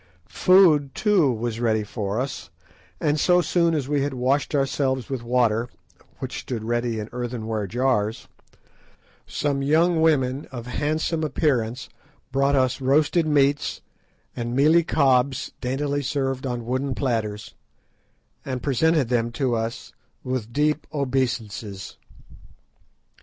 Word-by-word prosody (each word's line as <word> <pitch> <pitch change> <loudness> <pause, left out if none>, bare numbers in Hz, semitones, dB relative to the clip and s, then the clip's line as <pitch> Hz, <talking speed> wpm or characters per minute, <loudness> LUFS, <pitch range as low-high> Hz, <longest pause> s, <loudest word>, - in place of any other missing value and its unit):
Food 165 -7 +4
too 195 - +3
was 115 -1 -3
ready 110 -2 +1
for 105 0 -3
us, 135 0 -4 0.5
and 150 0 +1
so 180 +4 +4
soon 170 0 +2
as 140 -4 -2
we 145 -1 +1
had 140 -1 -2
washed 135 +4 0
ourselves 135 -2 0
with 130 -3 -2
water, 120 -1 +1 0.5
which - - -5
stood 115 -4 -5
ready 120 0 -1
in 105 -1 -4
earthenware 115 -4 -3
jars, 120 -1 0 1.0
some 140 -1 -1
young 160 +4 +3
women 140 -3 +1
of 120 -3 -7
handsome 155 +5 -1
appearance 130 -5 0 0.4
brought 140 +1 +2
us 130 -1 +1
roasted 150 +5 +2
meats, 145 -1 +1 0.5
and 120 0 -3
mealie 155 +5 +5
cobs 135 -4 +2
daintily 140 +3 -1
served 135 -1 -2
on 120 -2 -4
wooden 130 +2 -2
platters, 110 -5 -2 0.9
and 130 -2 -4
presented 150 0 +2
them 120 -1 +1
to 130 -3 0
us 115 0 -4 0.3
with 125 -3 -3
deep 150 +3 0
obeisances. 120 -8 -3
130 Hz, 125 wpm, -24 LUFS, 120-145 Hz, 1.0 s, mealie